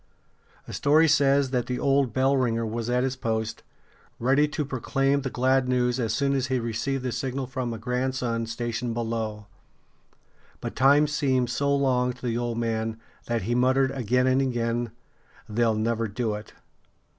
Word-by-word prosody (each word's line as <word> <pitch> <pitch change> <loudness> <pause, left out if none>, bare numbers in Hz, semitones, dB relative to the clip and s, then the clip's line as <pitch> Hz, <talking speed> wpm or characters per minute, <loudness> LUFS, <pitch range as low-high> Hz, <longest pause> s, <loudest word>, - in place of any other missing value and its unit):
A - - -7
story 155 +3 +4
says 140 -2 +3
that 125 -2 0
the 125 - -2
old 135 -2 +2
bell 135 +3 +2
ringer 115 -3 +1
was 115 +1 -3
at 125 +1 +2
his 130 0 -1
post, 110 -3 -2 0.6
ready 135 +5 +3
to 150 0 -3
proclaim 135 +1 0
the 135 - -3
glad 130 +1 +1
news 125 0 +1
as 115 -3 0
soon 140 +4 +1
as 130 -2 0
he 130 0 0
received 120 +4 -2
the 125 - -2
signal 130 +2 -3
from 130 -1 -3
a 115 - -4
grandson 125 -1 -2
stationed 120 +1 -3
below 115 -2 -3 1.1
But - - -6
time 140 +3 +5
seemed 135 -5 0
so 140 +2 +1
long 125 -2 +1
to 125 +1 -11
the 115 -2 0
old 120 -1 -2
man 115 -1 -2 0.3
that 115 -3 -1
he 115 +5 -1
muttered 130 +2 +3
again 125 -1 +1
and 130 +1 +3
again: 120 -2 -1 0.6
"They'll 115 0 +1
never 115 +1 0
do 110 +1 -2
it." 105 0 -8
125 Hz, 170 wpm, -26 LUFS, 115-135 Hz, 1.1 s, time